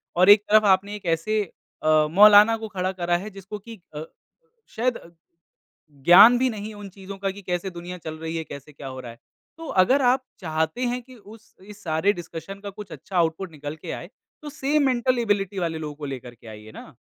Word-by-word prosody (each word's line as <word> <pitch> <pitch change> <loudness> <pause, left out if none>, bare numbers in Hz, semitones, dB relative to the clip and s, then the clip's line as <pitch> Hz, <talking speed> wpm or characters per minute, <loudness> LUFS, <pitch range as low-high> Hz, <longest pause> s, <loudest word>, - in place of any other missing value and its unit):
और 185 +3 +5
एक 205 0 +9
तरफ़ 215 0 +5
आपने 200 +1 +2
एक 200 - -11
ऐसे 170 +6 0 0.4
अ, 155 -1 +4
मौलाना 210 +3 +7
को 220 0 -7
खड़ा 185 -2 -3
करा 175 -2 -1
है 205 +4 -7
जिसको 195 +1 -9
कि 225 0 -12 0.2
अ, 150 - -5 0.7
शायद 245 +2 0 1.1
ज्ञान 205 +8 +8
भी 260 +1 +2
नहीं 215 -1 -7
उन 205 -1 -9
चीज़ों 195 +1 -10
का 195 0 -2
कि 200 +1 -10
कैसे 180 +1 -3
दुनिया 175 +1 -8
चल 160 -1 -7
रही 160 +1 -5
है 160 - -3
कैसे 140 +1 -11
क्या 140 0 -11
हो 130 0 -8
रहा 120 -2 -9
है। 115 - -18 0.4
तो 330 - -8
अगर 265 +9 +3
आप 255 +1 +2 0.2
चाहते 160 +5 -2
हैं 245 +1 -2
कि 255 +2 -16
उस 220 0 -17
इस 210 +1 -14
सारे 160 +5 +1
डिस्कशन 175 +2 -8
का 200 0 -7
कुछ 200 -3 -11
अच्छा 195 - -8
आउटपुट 170 +2 0
निकल 145 0 -7
कर 160 - -7
आए 175 - -8 0.3
तो 300 - -7
सेम 290 +1 0
मेंटल 250 0 +1
एबिलिटी 205 -4 -1
वाले 165 -2 -2
लोगों 150 -2 -6
को 150 - -8
लेकर 125 -3 -7
के 115 - -19
आइए 110 0 -11
ना। - - -12
195 Hz, 215 wpm, -24 LUFS, 160-215 Hz, 1.1 s, एक